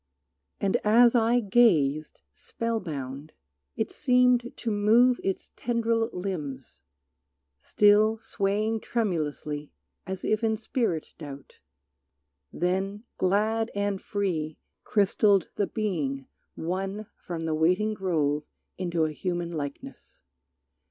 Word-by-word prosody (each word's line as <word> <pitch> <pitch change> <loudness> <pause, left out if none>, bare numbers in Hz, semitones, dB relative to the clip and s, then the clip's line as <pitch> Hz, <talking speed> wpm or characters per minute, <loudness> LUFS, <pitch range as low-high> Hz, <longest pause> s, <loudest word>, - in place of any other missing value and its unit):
And 195 -1 +2
as 235 +3 +5
I 235 0 +3
gazed, 165 - +2
spell 230 -1 -3
bound, 140 -4 -6 0.4
it - - -2
seemed 250 -1 +3
to 230 - -2
move 225 +5 +4
Its 195 - -3
tendril 230 -1 0
limbs, 150 -8 -5 0.8
still 210 - +4
swaying 215 0 -1
tremulously 155 -10 -2 0.4
As 190 -1 -5
if 215 +1 +1
in 220 -1 +2
spirit 220 - -2
doubt; 140 -3 -10 0.9
then 190 +4 -1 0.2
glad 215 +4 +1
and 200 -1 -1
free 170 -7 -2 0.3
Crystalled 200 -1 +3
the 200 - 0
being 150 -11 -2 0.3
won 195 +5 -3
from 165 -2 -6
waiting 175 +7 +2
grove 155 -7 0 0.3
Into 170 -3 0
a 155 - -2
human 175 +1 -3
likeness. 145 - -7
195 Hz, 105 wpm, -27 LUFS, 160-220 Hz, 0.9 s, as